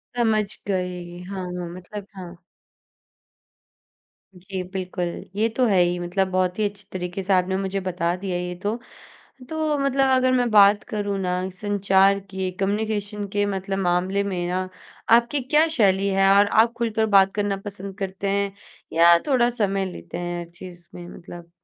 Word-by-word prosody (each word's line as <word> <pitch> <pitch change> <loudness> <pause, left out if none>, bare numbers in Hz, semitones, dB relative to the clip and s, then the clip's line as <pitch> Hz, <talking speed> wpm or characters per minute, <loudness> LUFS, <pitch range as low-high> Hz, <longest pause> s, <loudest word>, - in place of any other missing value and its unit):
समझ 220 -3 +2 0.2
गई। 180 -2 -3
हाँ, 190 0 -5
हाँ। 180 -1 -5
मतलब 190 +3 -9
हाँ। 180 -2 -9 2.0
जी 185 +1 -6
बिल्कुल। 185 -1 -3 0.3
ये 215 +2 +2
तो 255 - +4
है 205 -5 +3
ही 175 0 +1
मतलब 180 +2 0
बहुत 185 -1 0
ही - - +2
अच्छी 205 0 -17
तरीक़े 180 +1 -4
से 195 +1 +1
आपने 185 0 +2
मुझे 195 0 -2
बता 175 -2 -1
दिया 185 -2 -1
ये 180 0 -4
तो। 210 +2 0 0.7
तो 310 -2 -1
मतलब 275 -1 +2
अगर 255 0 +3
मैं 250 -1 +2
बात 205 0 +6
करूँ 205 -2 -2
ना 180 -1 -1 0.3
संचार 200 -1 +3
की, 190 -1 -4
कम्युनिकेशन 205 0 -1
के 205 +1 0
मतलब 195 -1 -3
मामले 185 +2 +1
में 180 -3 -2
ना, 185 +1 -2 0.4
आपकी 240 +5 +4
क्या 300 +5 +3
शैली 195 -2 +3
है 195 0 +3
और 205 +1 +6
आप 225 +3 +3
ख़ुलकर 225 -2 0
बात 195 0 +3
करना 205 -1 0
पसंद 200 -1 -8
करते 195 0 -3
हैं 200 0 0 0.4
या 170 +1 +6
थोड़ा 250 -4 +3
समय 200 -5 0
लेते 170 - -8
हैं 175 0 -3
हर 170 - -8
चीज़ 175 -1 -12
में 175 -1 -9
मतलब? 170 0 -11
195 Hz, 165 wpm, -23 LUFS, 180-210 Hz, 2.0 s, बात